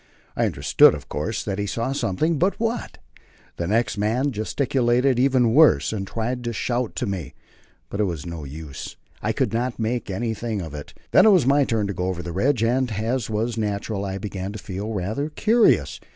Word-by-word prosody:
I - - +2
understood, - - +5
of - - -10
course, 105 +9 -3
that 100 -1 -3
he 100 - -1
saw 115 +5 -2
something, 145 - 0
but 190 +3 +1
what? 230 +1 -2 0.6
The 85 - -2
next 110 +1 +1
man 120 +7 +1
gesticulated 125 +2 +1
even 125 -3 +3
worse, 125 - +5
and 95 -2 -3
tried 120 +3 -3
to 120 - -2
shout 120 +1 -2
to - - -2
me. 95 -7 -4 0.5
But 100 - -6
it 105 - +3
was 85 -7 -4
no 85 -2 -6
use; 75 0 -8 0.3
I - - 0
could - - -1
not 120 +1 -1
make 115 0 -2
anything 110 +1 -2
of 80 -5 -6
it. 75 -1 -9 0.2
Then - - +7
it - - +8
was 180 -9 +4
my 140 +1 +4
turn 110 -4 0
to 100 - -3
go 90 - -2
over 90 -2 -3
the 85 - -5
ridge, 120 +5 +1
and, 125 +1 +1
as 115 +3 -1
was 110 +2 -1
natural, 105 -1 -2
I 95 -1 -3
began 100 -2 -5
to - - -6
feel 100 +2 -5
rather 110 - -2
curious. 225 +9 +3
110 Hz, 200 wpm, -23 LUFS, 100-125 Hz, 0.6 s, it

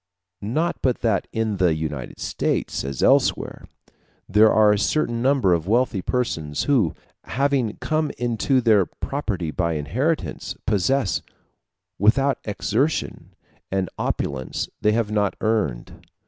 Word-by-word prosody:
Not 155 +12 -1
but 125 -2 0
that 110 -5 +1
in 110 -2 -1
the 90 -4 +3
United 75 -5 -5
States, - - -1
as 70 0 -3
elsewhere, - - +2 0.6
there 105 +2 +5
are 105 -1 +5
a 105 - +2
certain 120 -1 0
number 130 -8 +3
of 85 0 -1
wealthy 115 -2 +1
persons 80 - -2
who, 120 - +2 0.3
having 135 -4 0
come 155 -1 -1
into 120 +2 +1
their 110 -6 +4
property 100 - -3
by 85 0 -1
inheritance, 120 - -2
possess, 110 +4 +1 0.8
without 135 +7 +3
exertion, 115 +8 -2 0.3
an 95 -2 -1
opulence 65 -2 -2
they 105 - +3
have 110 -2 0
not 105 -3 +1
earned. 105 - -1
110 Hz, 125 wpm, -23 LUFS, 90-130 Hz, 0.8 s, there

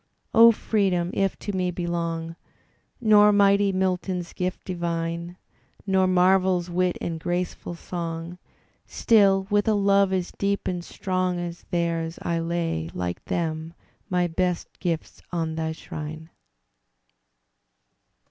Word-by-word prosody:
O 230 0 +9
Freedom! 190 -6 0
if 195 -1 0
to 205 - -5
me 180 -1 0
belong 170 -2 -3 0.6
Nor 210 -3 +6
mighty 200 0 +4
Milton's 185 -1 -1
gift 185 +1 -3
divine. 170 -1 -3 0.5
Nor 190 -1 +3
Marvell's 185 -1 +3
wit 180 0 +1
and 165 -1 -4
graceful 175 0 -3
song. 170 0 -5 0.5
Still 195 -4 +4
with 205 +1 +2
a 215 - +4
love 200 -1 +3
as 185 -2 -1
deep 200 0 -1
and 175 -1 -2
strong 185 -1 -2
As 175 0 -6
theirs, 170 -1 -1
I 170 -1 0
lay, 165 - -2
like 90 -1 -3
them, 160 0 -3 0.3
my 180 -1 +2
best 175 +1 -1
gifts 170 -3 -3
on 165 -2 -1
thy 160 0 -2
shrine! 160 0 -7
180 Hz, 120 wpm, -25 LUFS, 170-190 Hz, 0.6 s, O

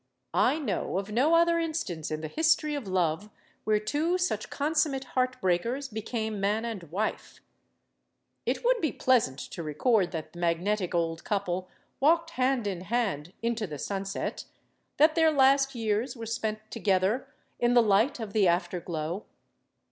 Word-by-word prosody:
I - - +3
know 210 - -2
of 200 +2 -3
no 275 +9 +3
other 335 0 +4
instance 305 - -3
in 155 0 -3
the 155 - -4
History 310 - +2
of 280 -8 -4
Love 185 +1 0 0.4
where 215 -1 +3
two 300 +11 0
such 360 0 -1
con 295 +3 -1
summate 300 -4 +1
heart 255 0 0
breakers 230 +10 0
became 220 -1 -3
man 210 +3 0
and 225 -5 -4
wife. 195 +8 -3 1.1
It - - -1
would - - +3
be 310 - +1
pleasant 230 - +2
to 170 - -7
record 180 - +1
that 160 -3 -6
the 175 - -10
magnetic 175 +3 0
old 165 -1 -1
couple 185 -3 -2 0.3
walked 330 +4 +3
hand 255 -5 +1
and 190 -4 -3
hand 190 -8 -1
into 230 -2 -1
the 150 -3 -6
sunset; 195 +5 -4 0.5
that 310 +2 +6
their 320 -1 +4
last 275 -2 +4
years 225 +3 -1
were 230 -2 -7
spent 215 -1 -4
together 210 +4 +1 0.3
in 240 0 +3
the 240 - +7
light 220 +6 +3
of 215 -3 -6
the 205 -4 +4
afterglow. 175 0 -1
220 Hz, 160 wpm, -28 LUFS, 185-270 Hz, 1.1 s, the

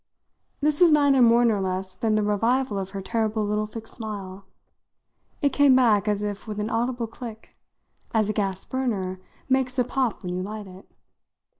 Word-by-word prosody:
This 300 +2 +1
was 345 -2 +7
neither 285 -3 +4
more 235 0 +6
nor 215 -4 +2
less 185 0 -2
than 215 +3 0
the 215 - +2
revival 225 +2 +1
of 190 -1 -4
her 195 0 -6
terrible 220 -1 -1
little 210 +1 -1
fixed 225 +1 -9
smile. 200 -4 -7 1.0
It 280 - +2
came 285 -2 +5
back 220 -5 +4
as 210 0 0
if 205 +1 -5
with 210 -1 -5
an 210 +1 -2
audible 240 +1 -1
click 225 -1 -10 0.6
as 220 -2 +2
a 215 - -1
gas 195 -3 -2
burner 200 -8 -2 0.3
makes 260 -1 +1
a 250 - +4
pop 250 -3 -1
when 180 -1 -3
you 180 - -2
light 210 +2 -6
it. 185 0 -14
215 Hz, 180 wpm, -25 LUFS, 200-250 Hz, 1.0 s, was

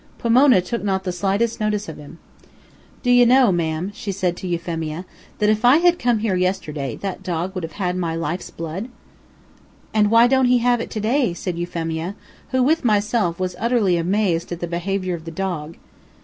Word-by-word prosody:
Pomona 240 -2 +5
took 235 +5 -4
not 190 -2 0
the 185 - -2
slightest 200 +6 0
notice 210 -1 -1
of - - -7
him. 150 +3 -12 0.9
"Do 245 - +2
you 245 0 +7
know, 250 -2 +5
ma'am," 170 +2 -1
said 185 -4 -3
she - - -11
to 185 - -4
Euphemia, 165 -1 -3 0.3
"that 210 - +1
if 215 +1 -1
I 250 +4 +7
had 350 +1 +3
come 240 -1 +2
here 210 -3 0
yesterday, 155 - -2
that 195 -1 -4
dog 180 0 -3
would 185 - -4
have 165 - -6
had 180 -3 -2
my 170 -3 -2
life's 165 +2 -3
blood." 165 +8 -6 1.0
"And 210 -1 +3
why 230 +2 +6
don't 265 +1 +3
he 250 0 +4
have 240 0 +2
it - - -5
to 220 - -4
day?" 230 -2 +1
said 175 -1 -4
Euphemia, 170 +1 -3 0.3
who, 260 -1 +2
with 315 +4 +2
myself, 210 -5 +1
was 185 -1 -2
utterly 225 -5 +2
amazed 175 0 0
at 175 - -4
the 175 - -2
behavior 185 +2 -2
of 165 -1 -6
the - - -5
dog. 165 -2 -4
190 Hz, 195 wpm, -21 LUFS, 170-230 Hz, 1.0 s, you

